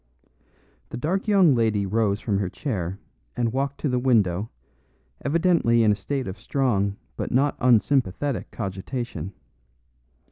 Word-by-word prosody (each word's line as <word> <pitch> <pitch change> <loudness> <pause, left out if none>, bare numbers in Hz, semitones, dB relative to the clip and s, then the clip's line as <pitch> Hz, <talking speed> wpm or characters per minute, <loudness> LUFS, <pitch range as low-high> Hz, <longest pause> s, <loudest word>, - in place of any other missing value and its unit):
The - - -6
dark 180 - -1
young 195 -8 +5
lady 110 -4 +1
rose 105 0 +1
from 100 -4 -1
her 95 -3 -1
chair 95 - -3 0.4
and 115 -2 0
walked 140 +1 -2
to - - 0
the 125 -2 +1
window, 110 -5 +2 0.7
evidently 160 -7 +3
in 110 - +5
a - - +2
state 130 +6 -3
of 95 +2 -6
strong 105 -5 0 0.2
but - - -4
not 140 +3 +2
unsympathetic 125 +1 +2
cogitation. 95 - -5
115 Hz, 135 wpm, -24 LUFS, 100-140 Hz, 0.7 s, young